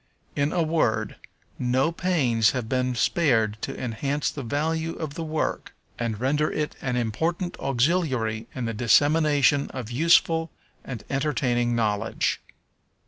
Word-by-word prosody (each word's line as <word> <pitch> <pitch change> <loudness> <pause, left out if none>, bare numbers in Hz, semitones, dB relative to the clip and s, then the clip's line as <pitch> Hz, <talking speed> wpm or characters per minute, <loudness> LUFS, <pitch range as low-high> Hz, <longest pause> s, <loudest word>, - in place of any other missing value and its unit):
In 145 +1 +1
a 175 - +1
word, 115 -10 0 0.4
no 130 +5 +1
pains 135 -12 +2
have 125 -4 -3
been 125 +1 0
spared 110 -6 +1
to 135 - -5
enhance 135 +4 -2
the 145 - -6
value 160 +6 -1
of 155 -3 -5
the 165 +1 -5
work, 155 -1 -3 0.2
and 115 -3 -2
render 150 +4 +1
it 150 -1 -2
an 125 -2 -1
important 160 - -1
auxiliary 130 -5 0
in 125 -2 -3
the 115 - -2
dissemination 145 +4 +3
of 125 -3 -6
useful 165 +3 +3 0.3
and 120 -6 -7
entertaining 125 -4 0
knowledge. 110 -1 0
135 Hz, 135 wpm, -25 LUFS, 120-155 Hz, 0.4 s, dissemination